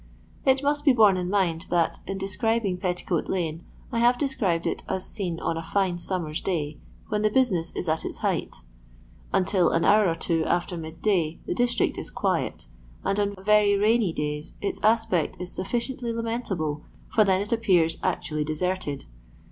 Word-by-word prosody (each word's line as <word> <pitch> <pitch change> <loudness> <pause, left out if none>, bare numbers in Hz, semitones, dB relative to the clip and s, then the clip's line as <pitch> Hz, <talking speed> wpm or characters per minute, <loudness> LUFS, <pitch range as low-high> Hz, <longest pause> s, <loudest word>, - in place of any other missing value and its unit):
It 265 +1 +4
must 290 +1 +1
be 280 - +6
borne 215 -5 +6
in 180 -1 -2
mind 180 -4 0
that, 170 -2 +1
in 195 - -3
describing 200 0 0
Petticoat 180 -2 -1
lane, 165 -3 -2 0.3
I 235 - 0
have 240 +1 +4
described 205 - 0
it - - -1
as 190 0 -2
seen 180 -6 -3
on 165 - -1
a - - -2
fine 180 +1 0
summer's 170 -4 -2
day, 155 -5 -2 0.3
when 210 0 0
the 215 - +3
business 205 -9 +1
is - - -3
at 160 0 +1
its. - - -5
height. - - -2 0.7
Until 185 -1 +3
an 165 0 +1
hour 210 -2 +5
or 165 - 0
two 165 -1 0
after 175 +1 0
midday 165 0 -1
the - - -1
district 245 -1 +1
is - - -3
quiet, - - -1 0.4
and 195 - 0
on 200 0 0
very 210 -1 +5
rainy 215 -1 +3
days 150 +1 -3
its 200 - -3
aspect 215 -6 +2
is 180 0 -5
sufficiently 240 +5 -2
lamentable, 225 -10 -2 0.3
for 215 - +6
then 190 -2 +3
it 205 +1 -4
appears 180 -8 +3
actually 155 -1 -1
deserted. 155 -1 -2
190 Hz, 170 wpm, -26 LUFS, 165-215 Hz, 0.7 s, be